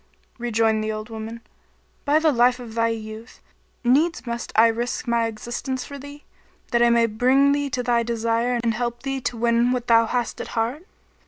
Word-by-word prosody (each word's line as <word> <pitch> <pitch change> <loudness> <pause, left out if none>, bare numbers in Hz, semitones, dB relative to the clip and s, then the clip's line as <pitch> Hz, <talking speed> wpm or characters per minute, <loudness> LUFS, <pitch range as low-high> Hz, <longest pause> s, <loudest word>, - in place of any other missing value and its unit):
Rejoined 225 -2 +1
the 215 - -2
old 215 +1 -6
woman, 225 +1 -7 0.6
"By 290 +1 +4
the 315 0 +3
life 245 0 +3
of 235 -3 -9
thy 230 0 +1
youth, 220 0 -6 0.4
needs 290 +6 +2
must 235 0 -4
I 225 - +7
risk 235 +2 -1
my 235 -1 +2
existence 240 +4 -5
for 280 0 -9
thee, 285 +1 -11 0.5
that 235 - +2
I 240 - +5
may 235 0 +4
bring 255 +5 +3
thee 285 0 0
to 250 -1 -2
thy 240 -1 +2
desire 230 +1 0
and 230 -1 +1
help 240 +2 -3
thee 270 -1 -3
to 240 - -3
win 235 +1 +2
what 250 -2 -1
thou 230 -1 +4
hast 245 0 -2
at - - -6
heart!" 250 - -2
235 Hz, 190 wpm, -23 LUFS, 230-255 Hz, 0.6 s, I